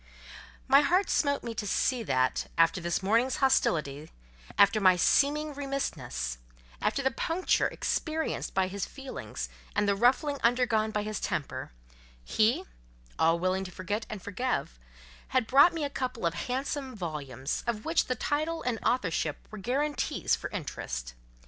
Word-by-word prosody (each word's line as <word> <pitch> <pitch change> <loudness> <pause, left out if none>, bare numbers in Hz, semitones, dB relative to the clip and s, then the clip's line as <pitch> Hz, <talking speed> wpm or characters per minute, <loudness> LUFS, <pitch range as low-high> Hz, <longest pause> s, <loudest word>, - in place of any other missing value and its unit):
My 275 +2 +7
heart 360 +7 +2
smote 285 -2 +1
me 230 - -4
to 210 -2 -4
see 250 +4 +1
that—after 165 - +1
this 170 +2 -1
morning's 230 +6 +2
hostility, 155 - +1 0.5
after 200 +2 +5
my 185 -2 +6
seeming 295 - +2
remissness, 135 - -3 0.4
after 275 - 0
the 265 - +2
puncture 345 +3 +1
experienced 320 0 -2
by 190 -1 +2
his 195 +1 -4
feelings, 270 -1 -6 0.3
and 205 0 +2
the 200 - +4
ruffling 265 +6 +2
undergone 235 -2 +2
by 210 -1 -1
his 215 -1 -3
temper—he, - - -2 0.6
all 165 +1 +4
willing 185 +2 0
to 190 - -6
forget 205 +5 -3
and 210 -3 -6
forgive, 205 - -2 0.5
had 255 -3 +1
brought 280 +8 +6
me 330 -2 -3
a 285 - -1
couple 255 -7 -3
of 170 - +1
handsome 260 - -3
volumes, 150 - -4
of 220 -2 -2
which 325 +1 +2
the 255 - -1
title 310 +6 -1
and 240 -3 -1
authorship 165 - 0
were 215 - -7
guarantees 280 +8 0
for - - -6
interest. - - -5
220 Hz, 145 wpm, -29 LUFS, 170-270 Hz, 0.6 s, My